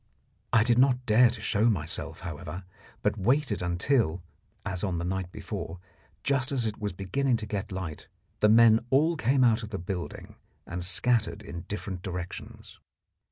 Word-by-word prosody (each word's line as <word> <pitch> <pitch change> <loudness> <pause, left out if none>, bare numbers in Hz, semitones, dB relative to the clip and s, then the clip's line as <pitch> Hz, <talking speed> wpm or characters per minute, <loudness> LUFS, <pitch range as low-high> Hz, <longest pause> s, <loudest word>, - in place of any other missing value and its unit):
I 115 -2 +5
did 120 0 +3
not 130 -1 +3
dare 120 +3 +6
to 115 -2 -6
show 110 +2 +2
myself, 80 -8 -2
however, 85 0 -6 0.4
but 105 0 +1
waited 125 +1 +1
until, 90 - +1 0.4
as 95 -2 -3
on 95 -4 0
the 85 - -2
night 95 0 -2
before, 85 -1 -6 0.5
just 135 -1 +1
as 130 -4 0
it 110 -1 -3
was 105 -1 -2
beginning 115 +8 0
to 110 - -5
get 105 -1 -4
light, 95 -5 -5 0.3
the 105 - +5
men 115 0 +7
all 155 +5 +3
came 130 -1 +2
out 115 -1 +4
of 105 - -7
the 100 - -4
building 90 0 -6 0.3
and 85 0 -5
scattered 105 +2 +1
in 85 -5 -7
different 100 -3 -4
directions. 90 -2 -7
105 Hz, 165 wpm, -28 LUFS, 90-120 Hz, 0.5 s, men